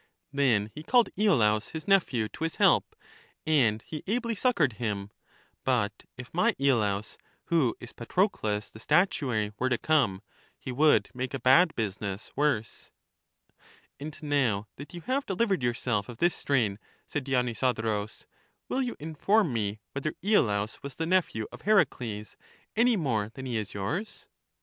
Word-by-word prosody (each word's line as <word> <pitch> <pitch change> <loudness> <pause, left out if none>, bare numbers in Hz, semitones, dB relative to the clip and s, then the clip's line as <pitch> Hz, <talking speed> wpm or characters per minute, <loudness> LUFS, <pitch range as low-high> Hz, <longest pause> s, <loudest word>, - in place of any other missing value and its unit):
Then 115 -7 +2
he 150 - -8
called 240 +8 +3
lolaus, 115 - +2
his 160 -1 -6
nephew, 155 - +3
to - - -7
his 165 - -2
help, - - +3 0.5
and 120 -9 +3
he 155 - -6
ably 235 +2 0
succored 200 - +2
him; 100 -3 -2 0.5
but 105 -6 0
if 125 0 -10
my 220 +7 +2
lolaus, 110 -7 +1 0.3
who 155 -9 +2
is 120 - -10
Patrocles 115 - -1
the 110 - -12
statuary, 125 - +1
were 130 - +1
to 125 - +2
come, 120 -12 +1 0.3
he - - -6
would 150 +4 +3
make 130 +1 -3
a - - -4
bad 155 +8 +5
business 100 -2 -4
worse. 140 -7 -1 1.1
And 145 +1 -7
now 125 -9 +1
that 145 +2 -9
you 175 - -7
have 265 - -1
delivered 195 - +1
yourself 120 -3 -1
of 120 - -8
this 175 +6 +2
strain, 110 -8 0 0.3
said 145 - -3
Dionysodorus, 120 -5 -1 0.4
will 265 - -1
you 250 -2 -2
inform 160 - +1
me 105 -2 -2
whether 140 +2 -3
lolaus 105 - +1
was 140 -1 -7
the 165 - -2
nephew 165 -11 +1
of - - -11
Heracles 125 - 0 0.4
any 235 +2 +4
more 115 - 0
than 130 - -7
he 125 -2 -3
is 110 -2 -3
yours? 150 - -4
130 Hz, 150 wpm, -28 LUFS, 110-165 Hz, 1.1 s, bad